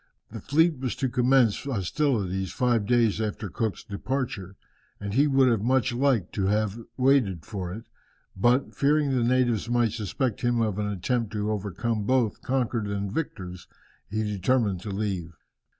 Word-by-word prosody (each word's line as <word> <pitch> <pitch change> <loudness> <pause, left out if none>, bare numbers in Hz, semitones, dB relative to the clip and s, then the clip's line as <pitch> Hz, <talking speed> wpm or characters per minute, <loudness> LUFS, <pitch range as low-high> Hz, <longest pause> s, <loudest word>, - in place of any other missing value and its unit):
The - - -7
fleet 160 0 +2
was 130 -2 -2
to 135 - -1
commence 125 -3 +3
hostilities 100 - -1
five 120 -4 +1
days 115 -3 +3
after 105 -1 -3
Cook's 110 -2 -2
departure, 105 -3 -4 0.4
and 100 -1 -4
he 140 +6 +4
would 130 -6 +3
much 130 +2 +2
have 120 - -4
liked 130 -10 +1
to 100 -4 0
have 105 +1 0 0.2
waited 125 - +2
for 95 -5 -5
it; 110 +5 -7 0.5
but, 120 +7 +2
fearing 145 0 +2
the 125 -3 +1
natives 120 -2 +1
might 120 -2 +2
suspect 115 +3 -2
him 120 -1 +1
of 105 -3 0
an 105 - -1
attempt 105 +3 -1
to 105 0 -1
overcome 105 +2 -2
both 125 -5 +1
conquered 120 -4 -1
and 100 -1 -3
victors, 90 - -5 0.4
he 110 +2 -1
determined 105 0 +1
to 105 - -6
leave. 95 -4 -3
115 Hz, 160 wpm, -26 LUFS, 100-130 Hz, 0.5 s, he